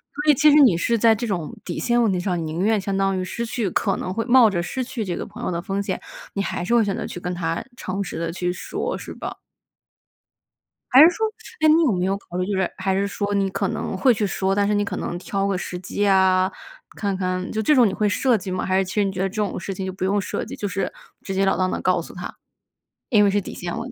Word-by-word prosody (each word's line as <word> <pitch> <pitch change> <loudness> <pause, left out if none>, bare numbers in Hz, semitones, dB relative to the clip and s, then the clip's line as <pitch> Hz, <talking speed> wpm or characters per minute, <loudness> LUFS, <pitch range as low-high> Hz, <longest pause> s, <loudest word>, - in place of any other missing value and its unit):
所 295 +1 +3
以 - - +5
其 300 +3 +5
实 - - +5
你 225 -10 +5
是 230 +7 +1
在 225 0 +5
这 235 +3 -3
种 180 -1 -3
底 - - -4
线 240 0 +2
问 225 -3 +3
题 185 - 0
上， 175 -3 -1
宁 160 +2 -3
愿 215 +1 +3
相 195 0 -2
当 195 -1 +1
于 185 - -1
失 235 +5 -4
去 230 -3 -2
可 195 +2 0
能 185 - -4
会 225 +3 -2
冒 245 -2 +6
着 180 -4 -1
失 255 +9 -3
去 240 -3 -4
这 180 -2 -2
个 - - -4
朋 - - -10
友 - - -1
的 170 -1 -2
风 195 +2 -2
险， 200 - -3 0.3
你 200 - -1
还 195 - -3
是 235 - 0
会 235 - +5
选 200 -2 -1
择 - - -4
去 - - -6
跟 180 0 -3
她 165 -2 -2
诚 195 -1 -3
实 180 - -6
地 165 0 -2
去 180 +1 -2
说， 180 - -4
是 - - -8
吧？ - - -6 1.6
还 260 +2 +9
是 325 - +9
说 440 +5 -1 0.4
诶， 310 - +5
你 320 +2 +6
有 285 - +3
没 180 -2 0
有 195 +1 0
考 175 - -12
虑， 180 - 0
就 205 - -1
是 190 - +1
还 190 0 0
是 200 +1 +1
说 200 0 -3
你 195 -1 +2
可 195 +1 -1
能 - - -3
会 250 +7 +4
去 215 -1 -1
说， 190 -1 0
但 200 0 +2
是 210 - +1
你 205 0 +2
可 - - -4
能 175 - -3
挑 195 +2 -2
个 200 - 0
时 180 0 -5
机 200 +3 -2
啊， 190 -1 +4 0.4
看 200 -2 -1
看 185 0 -2
就 220 - -1
这 295 +8 +4
种 245 -4 +6
你 195 - -2
会 210 +1 +1
设 250 +4 +2
计 190 -1 -7
吗？ 185 - -2
还 190 0 +1
是 195 - +3
其 185 - -7
实 210 - +3
你 195 - 0
觉 185 -1 -4
得 195 - +1
这 195 - -13
种 210 -3 -1
事 190 - -5
情 190 0 -5
就 190 - -4
不 185 - -5
用 195 +2 +2
设 195 - -3
计， - - -7
就 205 - -3
是 195 0 -2 0.3
直 195 - -5
截 195 +1 +2
了 195 - +2
当 185 0 +1
地 - - -2
告 - - +2
诉 - - -11
他。 - - -7 0.7
因 215 -5 +5
为 200 - +4
是 205 +1 +2
底 200 - -7
线 175 -1 -5
问 240 +3 -5
195 Hz, 310 characters per minute, -23 LUFS, 185-220 Hz, 1.6 s, 还